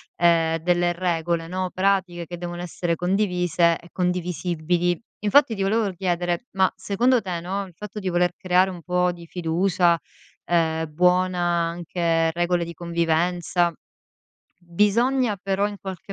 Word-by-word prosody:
ehm, 165 -1 +3
delle 175 +1 +1
regole, 170 -1 -1
no, 185 +1 -2
pratiche, 185 -3 0
che 175 +1 -7
devono 175 0 -5
essere 175 0 -2
condivise 180 -2 +1
e 170 - -16
condivisibili. 175 -1 -1 0.2
Infatti, 230 +4 +4
ti 195 - -4
volevo 215 +2 +1
r 185 - -9
chiedere: 175 +2 -1
ma 190 -1 +3
secondo 230 +6 +1
te 180 -4 -4
no, 195 +3 -3
il 180 - -16
fatto 210 +3 -7
di 190 - -2
voler 175 0 +2
creare 185 +1 +2
un 175 -2 -9
po' 180 0 +1
di 170 -1 -11
fiducia, 175 0 +1 0.5
ehm, 160 -2 0
buona, 180 +2 +2 0.3
anche 165 -1 0
regole 175 0 0
di 170 - -7
convivenza 170 +1 0 0.9
bisogna, 210 +7 +1
però, 195 +1 +1
in 205 - -8
qualche 190 0 -7
180 Hz, 145 wpm, -23 LUFS, 170-190 Hz, 0.9 s, Infatti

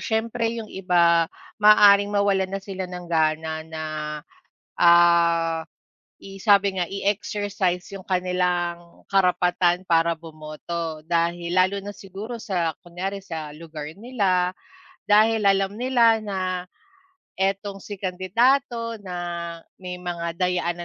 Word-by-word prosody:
siyempre 225 +1 -1
yung 220 -2 -7
iba 170 -3 +3 0.3
maaaring 205 -1 +7
mawalan 200 -2 +1
na - - -6
sila 190 -2 -5
ng 180 0 -7
gana 160 -1 0
na, 160 -1 -5 0.9
ah, 170 -1 +4 0.5
i 195 0 -12
sabi 200 -2 +3
nga, 175 - -1
i-exercise 200 -2 -1
yung 195 -1 -9
kanilang 180 -2 -1
karapatan 180 -1 +2
para 165 -1 +2
bumoto, 160 0 -6
dahil 170 +1 -1
lalo 185 +2 +3
na 205 - -6
siguro 205 +5 -8
sa 180 -7 -1
kunyari 190 +2 -5
sa 160 -5 -7
lugar 155 -1 -8
nila, 190 -4 0 0.5
dahil 215 +1 +5
alam 195 0 +2
nila 235 -2 +3
na 200 -2 -4 1.0
etong 195 +1 -2
si 205 -2 -8
kandidato, 230 +6 +1
na 175 -2 -5 0.2
may 180 0 -6
mga 170 -1 -5
dayaan 180 -1 0
180 Hz, 115 wpm, -24 LUFS, 170-200 Hz, 1.0 s, maaaring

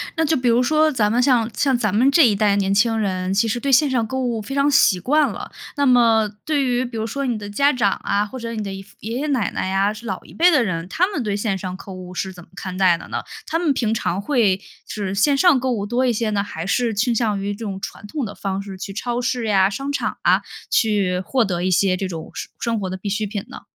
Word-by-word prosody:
那 325 - +1
就 315 -1 +2
比 250 - -1
如 235 +1 +4
说 310 +3 +3
咱 220 -6 +1
们 245 - +2
像 245 -3 +3
像 270 +4 +1
咱 215 -5 0
们 245 +6 +4
这 320 0 +6
一 210 - +2
代 205 -1 +2
年 195 -1 0
轻 225 +2 +3
人， 185 -3 -1
其 205 +3 +2
实 230 +2 -1
对 275 +3 -1
线 280 +3 +5
上 245 -4 +1
购 260 +3 -2
物 235 -3 -1
非 240 +6 -7
常 280 +1 +3
习 200 -9 +4
惯 295 - +3
了。 - - -7 0.2
那 285 -1 +1
么， 230 -3 +4 0.2
对 300 -3 +1
于 250 0 0
比 240 - -8
如 220 0 -2
说 275 +4 -3
你 240 -4 -1
的 205 -1 -7
家 280 +8 +2
长 210 -6 +2
啊， 200 +1 +1
或 260 +5 -8
者 230 -1 -5
你 215 -2 -3
的 200 - -5
姨 195 0 -6
父 - - -22
爷 225 +3 -4
爷 300 - -2
奶 260 -7 0
奶 - - -2
呀， 195 +2 +1
是 215 +2 -10
老 190 -4 -4
一 - - -15
辈 350 +2 +5
的 295 -6 +4
人， 175 -4 -3
他 350 - +1
们 345 - -3
对 205 -2 -1
线 205 -2 -1
上 185 -1 -5
购物 185 -1 -9
是 190 +1 -3
怎 180 -2 -12
么 165 - -22
看 185 -2 -6
待 185 -3 +4
的 - - -11
呢？ - - -2 0.3
他 325 - 0
们 320 -5 +2
平 225 -4 0
常 195 -3 -1
会 205 -6 +2 0.3
是 200 -3 -4
线 275 +8 +3
上 305 -2 +5
购 260 +1 -1
物 205 -4 -2
多 245 +3 +1
一 245 - +2
些 225 0 -1
呢？ 205 -1 0
还 165 -5 -6
是 235 +2 +1
倾 235 +4 +1
向 215 -4 0
于 200 +1 -2
这 225 +2 -7
种 195 -2 -5
传 - - -7
统 280 +5 -4
的 210 - -5
方 195 0 -3
式 195 -1 -8
去 195 +1 -6
超 240 +3 -2
市 250 -1 -1
呀、 195 -2 +4
商 275 +7 -4
场 285 - -2
啊， - - +3 0.3
去 200 -5 +1
获 260 -3 +2
得 180 -4 -2
一 185 - +1
些 185 +1 +3
这 190 - -2
种 165 -3 -7
生 - - -6
生 230 -1 -1
活 190 -2 -3
的 185 - -4
必 190 +2 -5
需 210 +2 -1
品 205 -1 -4
呢？ - - -9
220 Hz, 305 characters per minute, -21 LUFS, 195-255 Hz, 0.3 s, 这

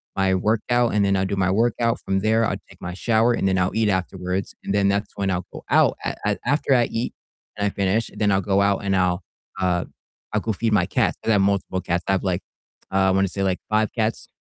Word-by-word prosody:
my 95 -1 +2
workout, 115 +5 +1
and 105 -1 +3
then 100 0 +2
I'll 95 0 +1
do 100 - -2
my 95 -1 +1
workout, 115 +3 +1
from 95 0 0
there, 110 +2 +2
I'll - - 0
take - - -17
my 90 - -5
shower, 115 +4 +2
and 95 - 0
then 95 0 +2
I'll 90 0 +1
eat 110 -2 +2
afterwards, 95 0 -2
and - - -3
then 100 -1 +2
that's 100 +1 0
when 100 -1 -1
I'll 90 -1 -2
go - - -9
out, - - +4
a - - -2
a 105 - +1
after 140 0 +2
I 120 -1 +4
eat 115 +2 -3 0.4
and 100 - 0
I - - +1
finish, 100 +3 0
then 105 -2 +1
I'll 95 0 +2
go 100 0 +2
out 100 0 +2
and 100 -1 +1
I'll, 90 0 +1 0.4
uh, 90 -2 +1 0.5
I'll 105 - +2
go 110 - -1
feed 110 +4 -1
my 105 - +3
cats - - +1
'cause - - -2
I - - +5
have 100 - +4
multiple 95 -1 0
cats, 85 0 -1
I - - +2
have 95 - +1
like, 95 -2 -1 0.5
uh, 95 0 +3
I - - +3
wanna 95 +1 +2
say 100 +2 -4
like 95 -1 +1
5 110 0 +1
cats 110 0 -1
100 Hz, 255 wpm, -23 LUFS, 95-110 Hz, 0.5 s, I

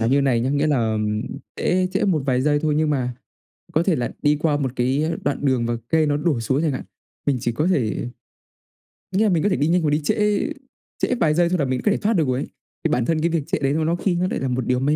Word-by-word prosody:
là 115 - +1
như 140 +4 +3
này 130 -4 +2
nhá, 125 +3 0
nghĩa 145 +2 +1
là 115 -7 +1 0.6
trễ 185 +1 +1
trễ 195 - +1
một 175 -8 +1
vài 130 -1 +2
giây 145 0 +2
thôi, 155 -2 +1
nhưng 155 0 +2
mà 125 -4 -1 0.6
có 160 - +3
thể 180 -2 +2
là 120 -3 -2
đi 150 0 +3
qua 150 -2 +1
một 135 -4 -1
cái 130 +5 +1 0.2
đoạn 145 0 -1
đường 130 -4 +2
và 120 0 -1
cây 160 -1 +3
nó 145 -1 +1
đổ 150 -4 0
xuống 130 +5 0
chẳng 160 -3 +1
hạn, 130 - -4 0.4
mình 140 -3 +2
chỉ 120 - -1
có 150 +9 0
thể 120 - 0 1.1
nghĩa 205 - +4
là 215 - +3
mình 170 -5 +1
có 205 - +3
thể 185 - +1
đi 145 - +1
nhanh 175 +1 +3
hoặc 155 - +1
đi 150 +2 +1
trễ 210 - +1 0.5
trễ - - 0
vài 160 -11 +2
giây 170 +1 +3
thôi 180 - 0
là 140 - +2
mình 130 -1 -1
có 210 - +4
thể - - +1
thoát 215 +2 +1
được 160 -8 +2
rồi 130 0 0
ấy. - - -4 0.4
Thì - - +1
bản 125 - +1
thân 160 +2 0
cái 170 - +2
việc 165 -3 0
trễ - - -1
đấy 135 0 +1
nó 160 +1 0
nó 165 +2 +1
khi 180 +1 0
nó 180 +1 +1
lại - - -1
là 135 - -2
một 125 -1 -1
điều 125 0 +2
may 145 +3 +2
150 Hz, 290 wpm, -22 LUFS, 130-170 Hz, 1.1 s, nghĩa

